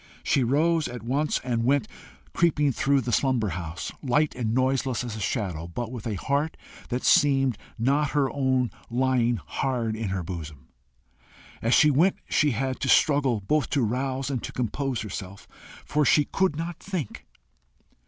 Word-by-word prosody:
She 135 Hz, -, +2 dB
rose 155 Hz, +6 st, +2 dB
at 120 Hz, -1 st, -7 dB
once 140 Hz, +6 st, 0 dB
and 120 Hz, -3 st, -1 dB
went, 135 Hz, -2 st, +2 dB, 0.5 s
creeping 150 Hz, -4 st, +2 dB
through 140 Hz, +2 st, +2 dB
the 120 Hz, 0 st, -3 dB
slumberous 120 Hz, -, +1 dB
house, 85 Hz, 0 st, -5 dB
light 145 Hz, +3 st, +1 dB
and 115 Hz, -3 st, -2 dB
noiseless 130 Hz, 0 st, +1 dB
as 120 Hz, -3 st, -5 dB
a -, -, -6 dB
shadow, 90 Hz, -6 st, -2 dB
but 115 Hz, +7 st, -5 dB
with 120 Hz, -3 st, -6 dB
a 110 Hz, -, -2 dB
heart 140 Hz, -, -1 dB, 0.3 s
that 125 Hz, 0 st, -2 dB
seemed 135 Hz, -6 st, +4 dB, 0.2 s
not 140 Hz, +5 st, +2 dB
her 140 Hz, -2 st, +3 dB
own 130 Hz, -3 st, +1 dB, 0.2 s
lying 120 Hz, -1 st, +2 dB
hard 120 Hz, -5 st, -1 dB
in 110 Hz, -2 st, -3 dB
her 95 Hz, -2 st, -2 dB
bosom. 80 Hz, -6 st, -8 dB, 0.9 s
As 115 Hz, +2 st, +3 dB
she 150 Hz, -, +6 dB
went 170 Hz, +8 st, +3 dB
she 150 Hz, -, +2 dB
had 130 Hz, +1 st, -2 dB
to 135 Hz, -, -2 dB
struggle 140 Hz, -7 st, +3 dB
both 150 Hz, +9 st, 0 dB
to 140 Hz, -4 st, +1 dB
rouse 130 Hz, +4 st, -1 dB
and 130 Hz, -4 st, -2 dB
to -, -, -6 dB
compose 125 Hz, +1 st, -2 dB
herself, 100 Hz, -2 st, -7 dB, 0.4 s
for 150 Hz, 0 st, +1 dB
she 145 Hz, +1 st, +4 dB
could 190 Hz, -1 st, 0 dB
not 165 Hz, +1 st, -5 dB
think. 180 Hz, -, -5 dB
130 Hz, 165 wpm, -26 LUFS, 115-145 Hz, 0.9 s, she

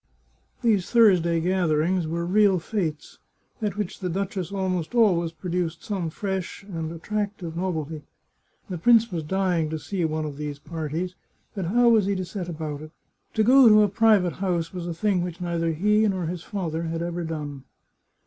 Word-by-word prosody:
These 210 Hz, -6 st, +2 dB
Thursday 180 Hz, -8 st, +4 dB
gatherings 175 Hz, -1 st, +1 dB
were 170 Hz, +1 st, -2 dB
real 200 Hz, +1 st, +4 dB
fetes, 165 Hz, -4 st, -4 dB, 0.4 s
at 205 Hz, -2 st, -2 dB
which 205 Hz, -4 st, -3 dB
the 180 Hz, -, -3 dB
duchess 190 Hz, 0 st, -3 dB
almost 190 Hz, 0 st, -2 dB
always 180 Hz, -8 st, +3 dB
produced 170 Hz, 0 st, -3 dB
some 190 Hz, -6 st, -2 dB
fresh 190 Hz, +2 st, -4 dB
and 165 Hz, -5 st, -5 dB
attractive 195 Hz, -1 st, -4 dB
nov 180 Hz, 0 st, -1 dB
elty. 155 Hz, 0 st, -4 dB, 0.7 s
The 180 Hz, -3 st, -5 dB
prince 230 Hz, +3 st, +5 dB
was 170 Hz, -3 st, -2 dB
dying 175 Hz, -1 st, 0 dB
to 160 Hz, -, -3 dB
see 180 Hz, +4 st, -3 dB
one 155 Hz, -1 st, -1 dB
of 145 Hz, -2 st, -6 dB
these 150 Hz, -1 st, -4 dB
parties, 165 Hz, +3 st, -4 dB, 0.4 s
but 195 Hz, -3 st, -3 dB
how 240 Hz, +7 st, +4 dB
was 220 Hz, -4 st, +4 dB
he 200 Hz, -, +1 dB
to 185 Hz, -1 st, -3 dB
set 180 Hz, -1 st, -5 dB
about 155 Hz, -3 st, -5 dB
it? 155 Hz, -, -9 dB, 0.5 s
To 220 Hz, -, +3 dB
go 255 Hz, +1 st, +7 dB
to 215 Hz, 0 st, +7 dB
a -, -, +4 dB
private 200 Hz, -3 st, +3 dB
house 180 Hz, -3 st, -2 dB
was 175 Hz, -2 st, -5 dB
a 170 Hz, -, -2 dB
thing 190 Hz, +1 st, +1 dB
which 175 Hz, -1 st, -5 dB
neither 170 Hz, -2 st, -1 dB
he 210 Hz, +6 st, +3 dB
nor 190 Hz, -4 st, -1 dB
his 170 Hz, +1 st, -4 dB
father 170 Hz, -5 st, -3 dB
had 165 Hz, +1 st, -2 dB
ever 175 Hz, 0 st, -3 dB
done. 145 Hz, -4 st, -5 dB
180 Hz, 180 wpm, -25 LUFS, 165-200 Hz, 0.7 s, go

